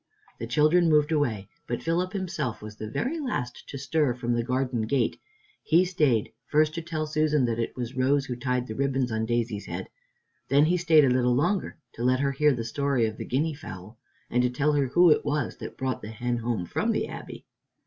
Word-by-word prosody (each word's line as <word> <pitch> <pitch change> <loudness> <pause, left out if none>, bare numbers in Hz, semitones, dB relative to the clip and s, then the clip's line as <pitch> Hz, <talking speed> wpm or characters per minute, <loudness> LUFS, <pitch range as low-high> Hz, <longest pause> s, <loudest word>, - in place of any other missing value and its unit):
The 115 - -4
children 155 +7 +4
moved 150 0 +3
away, 120 -11 0 0.2
but 120 - -3
Philip 175 +3 0
himself 170 - -3
was 110 0 -8
the 110 0 -6
very 270 - -2
last 185 - -4
to 140 - -6
stir 140 -1 0
from 120 -1 -2
the 120 - +1
garden 125 -1 -1
gate. 125 -2 0 0.4
He 170 +3 +4
stayed, 150 - +1 0.2
first, 155 0 +3
to 165 - -3
tell 160 -2 -3
Susan 150 -2 +1
that 115 -1 -1
it 115 - -2
was 125 0 -5
Rose 135 +2 +2
who 125 - -4
tied 125 0 -1
the 110 - -6
ribbons 135 -1 0
on 110 0 -1
Daisy's 115 -3 -1
head. - - -5 0.6
Then 140 +2 +5
he 175 +3 +2
stayed 160 -4 +5
a - - +3
little 125 -1 +2
longer 175 +9 0 0.2
to 120 - -6
let 130 +1 +3
her 140 0 +1
hear 150 +2 +3
the 120 -4 -2
story 135 0 +1
of 110 0 -4
the - - -5
guinea 155 +5 0
fowl, 110 - -10 0.3
and 125 - +1
to 125 - +2
tell 145 +4 +1
her 140 -2 +2
who 175 +5 +5
it - - +3
was 145 -3 -2
that - - -8
brought 130 -2 -2
the 105 - -7
hen 120 +2 -2
home 115 -5 -2
from - - 0
the - - -1
Abbey. - - -9
130 Hz, 220 wpm, -27 LUFS, 120-155 Hz, 0.6 s, Then